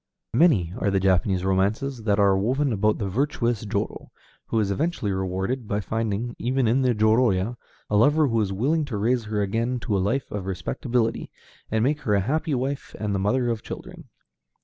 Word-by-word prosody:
Many 115 - +3
are 100 - +1
the 95 -1 +2
Japanese 95 0 +1
romances 110 +6 0
that 100 -2 +2
are 100 -2 +4
woven 130 +7 +1
about 105 +1 +1
the 100 - -2
virtuous 120 0 0
jōrō, 100 0 -3 0.4
who 115 - 0
is 100 -2 0
eventually 145 - -1
rewarded 95 +6 -2
by 100 - -1
finding, 110 +2 -2
even 130 0 +1
in 125 +4 +3
the 125 -2 +2
jōrōya, 110 -1 +2 0.3
a 105 - -1
lover 145 +8 +4
who 115 -3 +1
is 100 -2 -1
willing 140 +11 +1
to 120 -7 -4
raise 115 +3 +1
her 105 -1 -1
again 115 +5 -1
to 110 -4 -1
a - - +2
life 120 +8 -1
of 100 -2 -4
respectability, 115 +4 -1 0.4
and 110 0 +1
make 145 +4 +1
her 105 - +1
a 100 - +2
happy 155 - 0
wife 135 +3 -3
and 105 -1 -1
the 100 - 0
mother 120 +5 +1
of 115 -2 -2
children. - - -9
110 Hz, 195 wpm, -24 LUFS, 100-125 Hz, 0.4 s, are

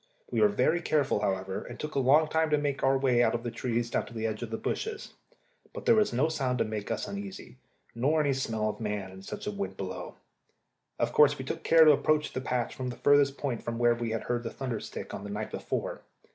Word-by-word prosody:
We - - +1
were 215 - +7
very 175 -4 +1
careful, 145 -9 +1
however, 95 -2 -2
and 120 - -10
took 150 0 -5
a - - +1
long 145 +4 +5
time 160 0 +1
to 150 - +3
make 145 -2 -1
our 135 0 +3
way 130 -3 +3
out 120 - +3
of 120 - -3
the 120 - -3
trees 120 0 -2
down - - 0
to 120 - -12
the 110 0 -2
edge 110 0 -2
of 120 - -4
the 110 - -3
bushes; 440 - -4 0.6
but - - -7
there - - +6
was 215 -2 +3
no 130 +6 +2
sound 135 -5 -1
to - - +2
make 110 -1 -4
us - - -2
uneasy, 200 -8 -7 0.4
nor 140 +7 +1
any 145 -2 +2
smell 110 -5 -1
of 105 -1 -3
man 105 -4 -3
in 95 0 -11
such 95 - -7
wind 100 -2 -3
as - - -27
blew. 95 -2 -6 0.8
Of - - 0
course 150 0 +5
we 130 - -6
took - - -4
care 165 -1 +6
to 155 - +9
approach 150 +1 +2
the 130 - -2
patch 125 -2 -2
at 130 -1 -2
the 120 - -5
furthest 145 -1 +4
point 130 -6 -2
from 115 0 -4
where 120 0 +4
we 120 -1 -3
had 115 0 -2
heard 120 -1 -1
the 115 - -4
thunder 125 -4 -4
stick - - -7
on 95 - -6
the 100 - -6
night 105 +1 -4
before. - - -3
125 Hz, 255 wpm, -29 LUFS, 110-150 Hz, 0.8 s, to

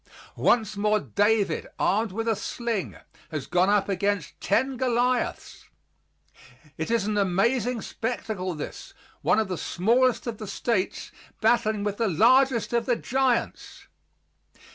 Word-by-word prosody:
Once 220 -3 +2
more 210 +1 +2
David, 205 -3 +1
armed 215 +2 +1
with 225 +4 -3
a 225 - +2
sling, 230 -2 -3 0.3
has 155 -4 -4
gone 180 +2 +2
up 205 -1 +2
against 200 -4 -1
ten 260 +6 +1
Goliaths. 250 0 -1 1.1
It 160 - -4
is 230 -3 +1
an 210 0 0
amazing 225 +5 +1
spectacle, 215 -6 -4
this, 150 - -8 0.3
one - - +3
of 220 -2 +1
the 180 -3 -4
smallest 240 +6 +1
of 230 -3 -5
the 215 - -6
States, 200 -2 -2 0.3
battling 215 -3 +2
with 205 -1 -2
the 230 - +1
largest 240 - +3
of 235 -1 0
the 245 - +3
giants! 260 0 -1
220 Hz, 135 wpm, -26 LUFS, 195-240 Hz, 1.1 s, one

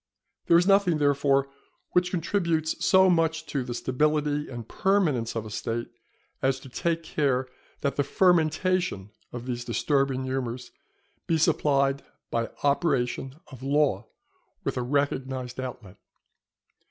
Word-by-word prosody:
There 170 - +6
is 175 - +3
nothing, 195 -4 +4
therefore, 140 -1 +2 0.4
which 180 0 +2
contributes 170 -3 -1
so 190 0 +6
much 165 -2 +1
to 140 -4 -2
the 120 -1 -5
stability 150 +3 0
and 120 -3 -7
permanence 155 - +1
of 110 -1 -3
a 110 - -8
State, 115 +3 -3 0.5
as 130 0 +1
to 135 - -11
take 165 +5 -1
care 135 -5 0 0.3
that 140 - -1
the 145 - +3
fermentation 175 - +1 0.2
of 120 0 -7
these 120 -1 -3
disturbing 135 +3 0
humours 130 -2 -4 0.6
be 165 - +2
supplied 140 -3 +2 0.3
by 115 0 -1
operation 135 -3 0 0.2
of 130 -2 -11
law 140 -6 +1 0.6
with - - -2
a 125 - -1
recognized 130 -1 -2
outlet. 125 -7 -7
140 Hz, 130 wpm, -26 LUFS, 125-160 Hz, 0.6 s, There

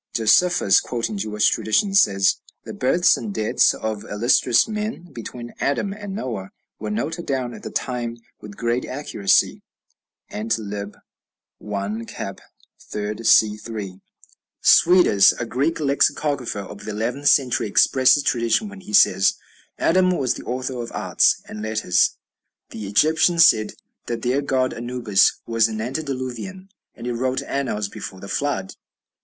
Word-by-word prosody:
Josephus, 115 - +4
quoting 115 -3 -4
Jewish 105 +1 0
traditions, 195 - +2
says, 95 -1 +2 0.3
"The - - -8
births 170 +8 +3
and 215 - -5
deaths 110 - +2
of 110 -2 -4
illustrious 120 +3 +2
men, 215 -5 -5
between 120 0 -8
Adam 195 +8 -1
and 205 -2 -7
Noah, 110 - -5 0.3
were 105 - -5
noted 155 +11 -3
down 130 -3 -2
at - - -10
the - - -7
time 120 -2 -3 0.2
with 105 -1 -11
great 120 +1 -1
accuracy." 105 -8 0 0.7
(Ant., 110 +2 -2
lib. 105 -1 -6 0.6
1, 105 +2 -4
cap. - - -7 0.5
iii., 105 +2 -4
see. 105 -1 +4
3.) 105 -4 -7 0.6
Suidas, 175 - +6
a 120 - -2
Greek 140 +8 -1
lexicographer 140 -5 0
of 100 +1 -10
the - - -6
eleventh 120 +7 -2
century, 130 -6 +3
expresses 130 +7 +4
tradition 115 - 0
when 200 -1 -11
he 205 +3 -11
says, 95 - +4 0.4
"Adam 185 +2 +3
was 130 -2 0
the - - -9
author 130 0 -4
of 120 - -7
arts - - +2
and 105 - -8
letters." 110 -4 +1 0.5
The 105 -2 -7
Egyptians 160 - +4
said 110 -1 +3 0.3
that 115 -1 -4
their 130 +3 +1
god 130 -2 0
Anubis 120 -4 +1
was 115 -1 +2
an 110 -1 -5
antediluvian, 135 - -5 0.3
and - - -10
it 120 - -2
"wrote 130 +2 -1
annals 125 -7 -2
before 95 -1 -9
the 100 - -10
Flood." 95 -2 -2
120 Hz, 145 wpm, -22 LUFS, 105-140 Hz, 0.7 s, Suidas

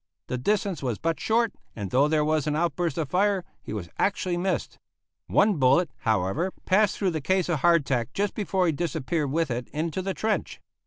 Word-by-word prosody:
The 125 - -2
distance 200 +5 0
was 125 -6 -2
but 165 0 -1
short, 230 0 +1 0.2
and 100 -4 -5
though 135 +3 +4
there 150 -1 +2
was 155 -1 +1
an 150 - 0
outburst 170 -1 0
of 160 -3 -1
fire, 195 0 +1 0.2
he - - -9
was 105 -5 -4
actually 190 -3 +1
missed. 185 +2 -2 0.5
One 205 -3 +3
bullet, 140 +4 +3
however, 110 - 0 0.2
passed 205 +2 +3
through 190 -3 +1
the 160 -2 -3
case 185 +4 +1
of 165 -4 +1
hardtack 135 -7 +2
just 200 +5 -1
before 190 -3 0
he 165 - +3
disappeared 155 -2 -2
with 160 -2 0
it 120 +1 -3
into 160 +4 -3
the 190 0 -3
trench. 220 -1 -2
165 Hz, 195 wpm, -26 LUFS, 140-190 Hz, 0.5 s, though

